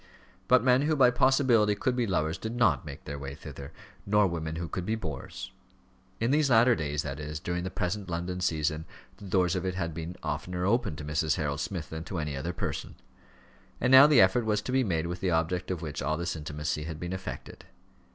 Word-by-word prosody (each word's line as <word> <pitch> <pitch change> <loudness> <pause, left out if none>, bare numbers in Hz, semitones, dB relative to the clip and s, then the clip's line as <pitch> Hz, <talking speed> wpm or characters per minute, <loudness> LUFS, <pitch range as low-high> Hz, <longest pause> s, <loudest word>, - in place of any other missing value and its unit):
But 125 -1 +5
men 125 0 +4
who 155 +2 +1
by 130 -3 +6
possibility 125 -5 +3
could 125 +5 0
be 120 -2 0
lovers 80 -4 0
did 110 +1 -4
not 120 -7 +2
make 70 - -8
their 70 0 -5
way 70 0 -6
thither, 70 -2 -9 0.3
nor 105 +1 +3
women 80 -3 -3
who 85 +1 -4
could 90 +3 -4
be 110 +5 -1
bores. 80 -11 -6 0.7
In 115 +3 +1
these 150 -1 +3
latter 120 +1 +6
days, 75 -5 -2
that 70 -1 -5
is, 75 0 -5
during 85 +1 -3
the 95 - -3
present 95 +1 -3
London 90 +2 -3
season, 80 -2 0 0.3
the 100 - -11
doors 90 -1 +2
of 90 - -2
it 95 -1 -2
had 85 -3 -2
been 80 +2 -6
oftener 90 +4 -3
opened 105 - +1
to 75 - -7
Mrs. 75 +1 +1
Harold 70 -2 -2
Smith 85 +1 -4
than 80 0 -5
to 90 - -5
any 75 -2 -2
other 75 +6 -3
person. 85 - -4 0.8
And 125 - +1
now 130 +2 +10
the 145 -6 +6
effort 95 +6 +4
was 105 -1 0
to - - -4
be 130 0 +3
made 85 -7 -1
with 85 +1 -4
the 95 - 0
object 85 +2 0
of 90 -3 -3
which 75 -3 -4
all 75 +3 0
this 85 +1 -2
intimacy 75 0 -3
had 80 -1 -6
been 90 +2 -4
effected. 95 0 -7
90 Hz, 220 wpm, -29 LUFS, 75-105 Hz, 0.8 s, now